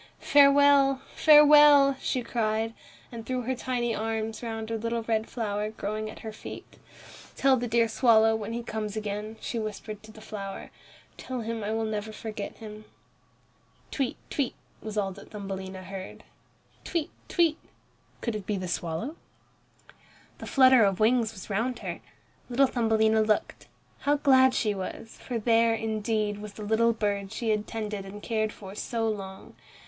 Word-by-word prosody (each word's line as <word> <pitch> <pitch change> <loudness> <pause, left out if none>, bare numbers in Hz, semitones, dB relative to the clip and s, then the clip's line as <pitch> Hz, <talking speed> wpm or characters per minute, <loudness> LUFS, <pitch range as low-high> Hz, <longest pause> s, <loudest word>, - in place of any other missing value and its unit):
"Farewell, 280 -1 +5
farewell!" 295 -2 +7
she 255 - -1
cried, 225 -1 -1 0.4
and 230 -2 -7
threw 255 +1 -3
her 260 +3 -1
tiny 245 -2 -2
arms 220 0 -3
round 225 -1 -5
a - - 0
little 230 +1 -2
red 220 -1 -1
flower 210 -3 -2
growing 215 0 -4
at - - -11
her 220 - -6
feet. - - -10 0.6
"Tell 270 -1 +4
the 245 -1 -2
dear 230 0 +3
swallow, 225 -1 +4
when 220 0 -4
he 235 +1 -4
comes 215 -2 -4
again," 210 +1 -4
she 235 - -4
whispered 215 -1 -6
to 215 0 -13
the 215 - -14
flower, 200 -2 -7 0.5
"tell 255 -2 -5
him 225 -1 -4
I 205 - -2
will 225 0 -1
never 215 0 -3
forget 215 -1 -6
him." 215 -1 -10 1.1
"Tweet, 270 -3 -2
tweet!" 280 -4 -1 0.2
what 215 -1 -7
was 195 -2 -1
that 200 - -13
Thumbelina 190 -2 -6
heard? 190 0 -8 0.6
"Tweet, 335 -4 -2 0.2
tweet!" 330 -3 +2 0.6
Could 235 -2 -2
it 205 -3 -6
be 210 - -1
the 185 -1 -4
swallow? 175 - -3 1.2
The - - -8
flutter 260 -3 +6
of 195 -2 +1
wings 225 0 +3
was 190 -4 -10
round 230 +5 -1
her. - - -6 0.5
Little 260 +3 +4
Thumbelina 220 -3 +2
looked. 215 -1 -1 0.3
How 290 +1 +2
glad 260 -2 +5
she 215 -2 +1
was, 200 +3 -7
for 245 - -3
there, 230 0 +3
indeed, 215 -1 -1
was 210 -1 -8
the 215 - -8
little 225 +2 +3
bird 200 -3 -2
she 225 0 -1
had 210 0 -1
tended 210 -3 -4
and 200 +2 -10
cared 215 -2 -1
for 195 -2 -10
so 225 +2 -2
long. 195 -3 -6
220 Hz, 165 wpm, -27 LUFS, 210-240 Hz, 1.2 s, farewell